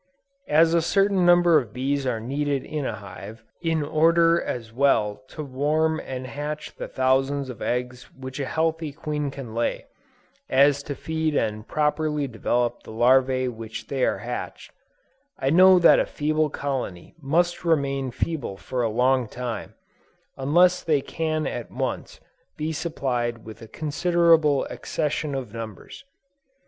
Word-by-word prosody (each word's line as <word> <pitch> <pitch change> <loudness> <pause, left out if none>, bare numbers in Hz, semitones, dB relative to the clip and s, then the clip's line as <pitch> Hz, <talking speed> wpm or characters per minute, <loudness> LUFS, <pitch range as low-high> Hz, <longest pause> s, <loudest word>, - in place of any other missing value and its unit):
As 160 +2 +5
a 170 - +4
certain 195 +1 +2
number 175 -2 +6
of 120 -6 -8
bees 135 +2 -1
are 120 -3 -1
needed 140 +3 -2
in 150 -3 -3
a 110 - -3
hive, 100 +2 -10 0.2
in 165 -3 0
order 165 +3 +3
as 115 -2 -5
well 115 -6 +2
to 155 - -7
warm 150 +4 0
and 130 -3 -6
hatch 150 +4 -5
the - - -6
thousands 135 +1 +1
of 120 - -12
eggs 125 0 -3
which 130 +1 -7
a 135 - -2
healthy 160 0 -1
queen 150 -1 -3
can 135 -5 -8
lay, 115 +1 -1 0.6
as 140 +1 +4
to 145 0 -6
feed 160 +1 -2
and 110 -2 -1
properly 150 -1 0
develop 120 0 -1
the - - -12
larvæ 130 +3 +3 0.2
after 110 0 -7
they 135 -2 -2
are - - +2
hatched, - - -6 0.7
I 135 - 0
know 185 +3 +7
that 170 - +6
a - - 0
feeble 155 +1 0
colony 130 -12 -4
must 175 +5 +1
remain 140 -5 +1
feeble 130 -4 -3
for 125 +5 -3
a 115 - +1
long 125 +2 +2
time, 120 -2 -6 0.6
unless 175 +7 +3
they 150 -4 +1
can 155 +1 -2
at 120 - -4
once - - -4 0.4
be 155 +1 -2
supplied 125 -8 -2
with 110 +1 -10
a 115 - -10
considerable 155 +1 +2
accession 150 -1 -3
of 125 -6 -5
numbers. 115 - -8
140 Hz, 150 wpm, -24 LUFS, 125-155 Hz, 0.7 s, know